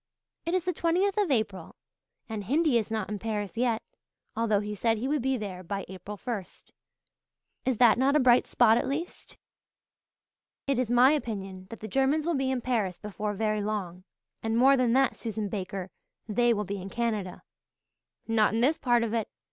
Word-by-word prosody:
It 340 - +1
is 370 -1 0
the 360 - 0
twentieth 365 +5 +1
of 405 -5 +1
April, 205 - -1 0.5
and 215 -3 -5
Hindy 285 - +3
is 220 - -4
not 220 -3 -2
in 210 -1 -4
Paris 210 -2 -3
yet, 235 -1 0 0.5
although 220 -3 +2
he 210 0 -4
said 225 +2 +1
he 240 +5 -2
would 295 0 0
be 265 +1 0
there 195 -5 -6
by 195 +2 -4
April 190 +3 -8
first. 210 -5 -7 0.9
Is 260 -3 +1
that 240 0 +5
not 275 +2 +3
a - - +5
bright 250 -2 +5
spot 230 -1 +4
at - - -2
least?" 305 +6 -5 1.3
"It 275 -3 0
is 250 -3 0
my 245 +3 +6
opinion 195 -9 -4
that 230 - -9
the 215 - -5
Germans 270 +6 +1
will 340 - +1
be 270 -3 0
in 260 -2 -1
Paris 215 -8 -1
before 210 +1 -4
very 215 0 0
long 195 -4 -4 0.4
and 225 0 -1
more 270 +3 +6
than 250 -3 +2
that, 265 0 +3
Susan 215 -2 -4
Baker, 190 -2 -5 0.4
they 240 +2 +2
will 210 -2 +1
be 200 0 -4
in 190 - -7
Canada." 215 -5 -3 0.8
"Not 220 -1 +3
in 225 - +1
this 290 +6 +2
part 240 -2 +3
of 230 -1 -2
it. 225 -2 0
225 Hz, 190 wpm, -28 LUFS, 205-260 Hz, 1.3 s, my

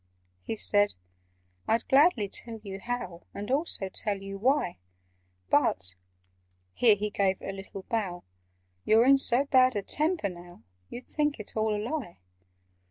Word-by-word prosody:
He 220 - -5
said 205 -1 +2 0.7
"I'd 225 +1 +1
gladly 270 - +4
tell 225 +3 -5
you 195 -2 -7
how, 240 -7 -5
And 205 +4 -5
also 275 - +1
tell 200 +1 -2
you 195 0 -7
why; 255 - +1 0.7
But" 95 0 +2 0.8
(here 225 -4 +5
he 210 +1 -3
gave 195 -2 +1
a - - -5
little 195 0 -9
bow) 195 -7 -3 0.6
"You're 225 +2 +5
in 275 +1 +6
so 260 +1 +3
bad 255 -3 +4
a 205 - -1
temper 310 - 0
now, 175 -5 -12 0.3
You'd 245 - -8
think 295 -3 -1
it 215 - -8
all 215 -1 +1
a - - -1
lie. 235 - -4
215 Hz, 150 wpm, -28 LUFS, 195-255 Hz, 0.8 s, in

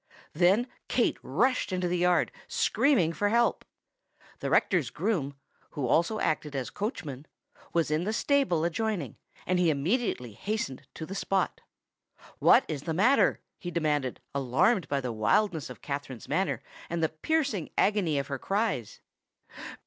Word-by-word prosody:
Then 185 +8 +4 0.2
Kate 245 - +1
rushed 225 - +1
into 180 -1 0
the 175 0 0
yard, 180 0 +3 0.2
screaming 205 - +2
for 205 +4 0
help. 235 +2 +2 0.8
The - - -3
rector's - - +2
groom 145 -11 -1 0.4
(who 140 - 0
also 170 - +2
acted 150 -2 -1
as 130 -3 -3
coachman) 155 - -5 0.4
was 165 -3 +1
in 155 +2 +1
the 210 - -1
stable 255 - +2
adjoining; 175 - -2 0.3
and 185 0 +1
he 175 -2 +4
immediately 150 - 0
hastened 145 - -4
to 160 - -5
the 190 - -7
spot. 195 -1 -1 0.8
"What - - +6
is 145 -3 -3
the 160 +1 -3
matter?" 245 +10 +4 0.2
he 175 - -5
demanded, 150 -6 -1
alarmed 140 - +2
by 140 -1 0
the 125 -2 -3
wildness 150 - +1
of 125 - -11
Katherine's 140 -4 -5
manner - - 0 0.3
and 170 -1 -1
the 160 - +3
piercing 250 - -1
agony 195 -8 +2
of 140 - 0
her 135 -1 -4
cries. 200 - -2
170 Hz, 150 wpm, -28 LUFS, 140-210 Hz, 0.8 s, What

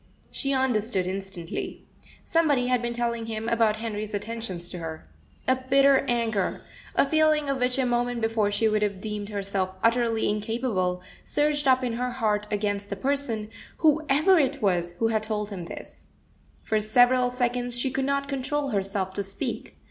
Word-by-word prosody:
She 275 - 0
understood 235 -7 +1
instantly. 190 -2 -5 0.4
Somebody 300 -6 +2
had 250 -1 +2
been 240 0 -2
telling 235 -1 -1
him 220 0 -3
about 225 -2 +3
Henry's 215 -1 -4
attentions 210 -4 -4
to 180 - -6
her. 160 - -7 0.4
A 260 0 +4
bitter 275 0 +6
anger, 225 -5 0 0.3
a - - +4
feeling 310 0 +3
of 275 -1 0
which 250 +1 +1
a 265 - +2
moment 245 0 0
before 225 -2 +1
she 215 +2 +2
would 215 -1 +1
have 200 -2 -1
deemed 210 0 -4
herself 195 -2 -2
utterly 230 -1 +2
incapable, 210 -4 -1 0.2
surged 295 -1 +1
up 260 0 +4
in 245 -2 -1
her 250 +2 -1
heart 210 -4 0
against 205 -1 -1
the 200 - -2
person, 230 -3 -1 0.3
whoever 310 +3 +4
it 280 0 +1
was, 175 -5 +1
who 225 +3 +1
had 220 -1 +1
told 210 -1 -3
him 180 -4 -5
this. - - -9 0.6
For 215 - +1
several 245 +4 +4
seconds 245 -1 0
she 260 +2 0
could 265 +1 -1
not 280 0 0
control 280 +1 -1
herself 195 -2 -2
to 200 - -2
speak. 195 0 -5
230 Hz, 170 wpm, -26 LUFS, 205-260 Hz, 0.6 s, bitter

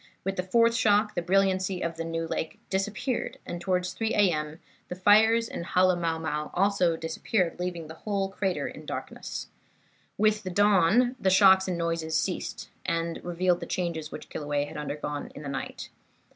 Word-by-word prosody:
With 195 +1 -2
the 180 - 0
fourth 230 +5 +3
shock 210 -2 +3
the - - -1
brilliancy 190 0 +1
of 170 -1 -2
New 165 0 -2
Lake 160 - -4
disappeared, 210 +6 -2
and 175 0 -5
towards 180 0 0
3 225 +3 -1
A. 200 -3 +4
M. 150 0 -3 0.3
the 180 - -5
fires 220 +4 +5
in - - -5
Halemaumau 165 -4 +1 0.5
disappeared 165 +3 0
also, 180 - -5
leaving 175 -2 -4
the 155 - -9
whole 195 +3 -2
crater 195 -1 -1
in - - -10
darkness. - - -6 0.7
"With 215 0 +3
the 190 - -5
dawn 205 +5 +4
the 190 - +2
shocks 190 0 +6
and 180 -2 -1
noises 165 -1 -1
ceased, 180 +3 -3
and 165 -1 -2
revealed 175 0 +1
the - - -6
changes 165 -4 -3
which - - -8
Kilauea 145 -1 -2
had - - -11
undergone 150 0 -4
in 150 - -8
the 140 - -5
night. 135 - -5
180 Hz, 170 wpm, -27 LUFS, 165-195 Hz, 0.7 s, shocks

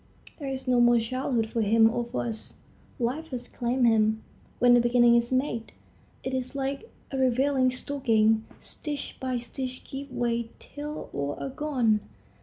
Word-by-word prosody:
There 280 -3 -4
is 265 0 -4
no 250 -1 +4
more 240 0 +6
childhood 230 -1 -1
for 230 - 0
him 225 +1 +5
or 240 +1 0
for 235 +1 -3
us. 225 -2 -2 0.4
Life 265 +7 -2
has 250 -5 -5
claimed 245 +1 0
him. 220 -1 +3 0.3
When 245 0 +6
a - - +6
beginning 240 0 +5
is 235 +1 +2
made, 255 -3 -1 0.5
it 260 - -3
is 255 0 -2
like 275 - -3 0.2
a 270 - -2
raveling 260 +1 +3
stocking; 225 -5 +2
stitch 295 -2 -6
by 255 -1 -1
stitch 255 +1 -5
gives 275 +1 -7
way 235 -2 -1
till 300 +1 -7
all 140 0 -2
are - - -3
gone. 255 -6 +1
245 Hz, 165 wpm, -27 LUFS, 230-265 Hz, 0.5 s, more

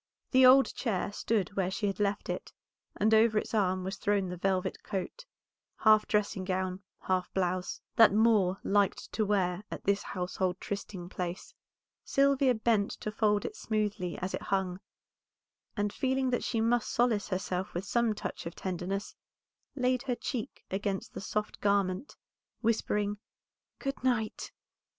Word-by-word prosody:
The 260 -1 +7
old 270 +1 +6
chair 205 -5 -1
stood 205 -1 -1
where 190 -2 +1
she 205 +3 -2
had 195 0 -1
left 205 0 0
it, - - -4 0.4
and 220 +2 +3
over 220 0 +5
its - - -2
arm 185 -3 +1
was 190 +1 -4
thrown 200 -2 +1
the 180 - -4
velvet 185 +1 -1
coat, 205 - -5 0.5
half 215 -1 +5
dressing 210 -2 0
gown, 185 0 -2 0.2
half 185 -1 -1
blouse, 185 -1 -1 0.2
that 225 -4 +8
Moor 210 -3 +4
liked 200 -1 +1
to 220 - 0
wear 190 -3 +1
at - - -6
this 200 0 +2
household 180 0 -2
trysting 200 -3 -5
place. 180 -1 -5 0.5
Sylvia 275 -2 +3
bent 220 -2 +2
to 215 - -3
fold 210 -1 +1
it 430 - -4
smoothly 210 - -2
as 185 +1 -4
it - - -3
hung, 190 -2 -1 1.0
and 205 0 0
feeling 265 -1 0
that 245 - 0
she 225 -2 0
must 230 0 +2
solace 235 -4 +1
herself 185 -1 -3
with 180 +3 -2
some 235 +1 +1
touch 205 - -5
of 170 - -7
tenderness, 190 +2 -3 0.6
laid 255 -2 +1
her 250 -2 -1
cheek 250 +1 -5
against 195 0 -2
the - - -6
soft 210 +1 -3
garment, 200 +3 0 0.5
whispering 210 -2 0 0.6
"Good 275 -2 -4
night." 230 -4 0
205 Hz, 155 wpm, -30 LUFS, 185-225 Hz, 1.0 s, that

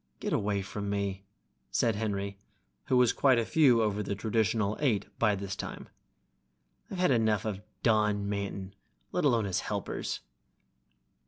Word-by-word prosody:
"Get - - -2
away 100 -1 0
from 100 +1 -5
me!" 100 -1 -2 0.4
said 115 -2 +1
Henry, 100 -2 -2 0.5
who 130 - +2
was 125 -2 +5
quite 135 -3 +4
a 115 - +1
few 125 -7 +5
over 105 -1 0
the 100 0 -2
traditional 110 0 +1
eight 125 -9 +1
by 105 -3 +3
this 100 0 -4
time. - - -7 1.0
"I've 195 - -5
had 180 -4 +3
enough 110 -4 +2
of 105 -3 -3 0.2
Don 105 -2 +2
Manton, 100 -1 -3 0.4
let - - 0
alone 120 -6 +3
his 95 -3 0
helpers." - - -3
105 Hz, 150 wpm, -30 LUFS, 100-115 Hz, 1.0 s, was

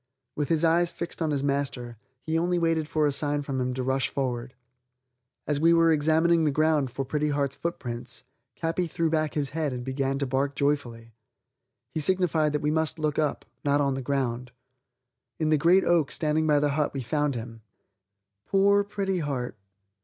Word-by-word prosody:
With 145 -2 -2
his 165 0 +2
eyes 170 +1 +3
fixed 170 0 -6
on 160 - +1
his 140 -2 -1
master, 140 -4 -2 0.3
he 160 - -2
only 175 +2 +1
waited 165 -2 +1
for 155 0 +1
a 145 - +2
sign 145 +1 0
from 135 -2 -3
him 125 0 -1
to 130 - -2
rush 130 +1 0
forward. 125 -2 -3 0.9
As 150 -1 0
we 165 +2 +5
were 165 0 +5
examining 160 +2 +3
the 155 - +3
ground 155 -2 +2
for 135 +2 -4
Pretty 150 +2 -1
Heart's 140 -2 -1
footprints, 120 -8 -5 0.4
Capi 170 +2 -1
threw 165 0 -1
back 155 -1 0
his 145 -3 0
head 155 -2 -1
and 125 -1 -5
began 135 +1 -1
to 140 - -1
bark 135 +2 -1
joyfully. 120 -6 -2 0.8
He - - -1
signified 160 -2 +2
that 150 - -1
we 150 - +1
must 160 0 0
look 155 -1 -1
up, 150 -2 -1 0.2
not 145 0 +2
on 140 -1 +1
the 135 - -3
ground. 125 -2 -2 0.9
In 155 -1 +1
the 155 - +5
great 175 +5 +5
oak 165 -5 +2
standing 155 0 0
by 150 -1 +4
the 145 0 +1
hut 145 0 -1
we 135 - -3
found 145 +2 0
him. 115 -1 -7 0.9
Poor 200 +1 +4
Pretty 200 -2 -2
Heart! 135 -6 -3
150 Hz, 190 wpm, -26 LUFS, 135-160 Hz, 0.9 s, we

